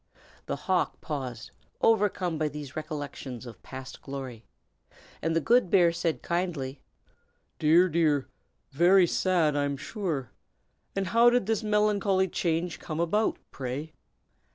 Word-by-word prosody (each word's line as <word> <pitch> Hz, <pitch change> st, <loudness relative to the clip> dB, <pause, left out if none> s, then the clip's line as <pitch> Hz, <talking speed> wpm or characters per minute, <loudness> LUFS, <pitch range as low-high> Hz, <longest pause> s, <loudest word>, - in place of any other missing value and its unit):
The -, -, -1 dB
hawk 185 Hz, -2 st, 0 dB
paused, 130 Hz, -7 st, -5 dB, 0.3 s
overcome 195 Hz, -7 st, +2 dB
by 155 Hz, -, +1 dB
these 145 Hz, -2 st, -7 dB
recollections 145 Hz, -5 st, -6 dB
of 115 Hz, -5 st, -11 dB
past 130 Hz, 0 st, -9 dB
glory, 130 Hz, -5 st, -7 dB, 0.7 s
and 165 Hz, 0 st, 0 dB
the -, -, +4 dB
good 235 Hz, +3 st, +3 dB
bear 175 Hz, -2 st, +5 dB
said 170 Hz, -1 st, -2 dB
kindly, 165 Hz, -7 st, -2 dB, 0.8 s
"Dear! 165 Hz, +4 st, +5 dB
dear! 155 Hz, -5 st, +2 dB, 0.4 s
very 175 Hz, +6 st, +5 dB
sad, 170 Hz, -4 st, +2 dB
I'm 145 Hz, -1 st, 0 dB
sure. 155 Hz, -, -4 dB, 0.6 s
And 195 Hz, 0 st, 0 dB
how 230 Hz, +4 st, +5 dB
did 245 Hz, -4 st, +2 dB
this 220 Hz, 0 st, 0 dB
melancholy 210 Hz, -3 st, +2 dB
change 170 Hz, 0 st, -1 dB
come 155 Hz, -1 st, -5 dB
about, 210 Hz, +6 st, +1 dB
pray?" 135 Hz, +4 st, -5 dB
165 Hz, 130 wpm, -28 LUFS, 140-190 Hz, 0.8 s, bear